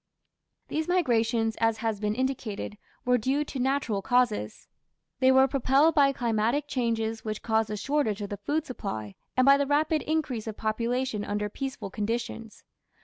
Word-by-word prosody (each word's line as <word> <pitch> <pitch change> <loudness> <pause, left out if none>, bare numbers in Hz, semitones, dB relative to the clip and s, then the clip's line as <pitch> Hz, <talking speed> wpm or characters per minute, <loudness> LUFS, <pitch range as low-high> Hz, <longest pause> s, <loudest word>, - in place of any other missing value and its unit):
These 310 +1 -2
migrations, 230 -10 +1
as 225 -1 +2
has 220 -2 -2
been 210 0 -1
indicated, 240 -5 -3 0.3
were 250 0 +3
due 270 +6 +1
to 275 - -6
natural 255 -6 0
causes. 240 - 0 0.5
They 260 0 +5
were 265 0 +6
propelled 275 +4 +3
by 280 -2 +5
climatic 235 +3 0
changes 225 -4 -1
which 215 -1 -4
caused 220 -1 +1
a 210 - -3
shortage 220 -4 0
of 200 - -5
the 205 - -3
food 295 +10 -1
supply, 110 - -5 0.2
and 255 - +5
by 275 0 +7
the 280 0 0
rapid 305 +2 +2
increase 280 -8 -2
of 215 - -5
population 230 +1 -1
under 210 0 -2
peaceful 265 -4 -5
conditions. 225 +1 -4
235 Hz, 160 wpm, -27 LUFS, 215-275 Hz, 0.5 s, by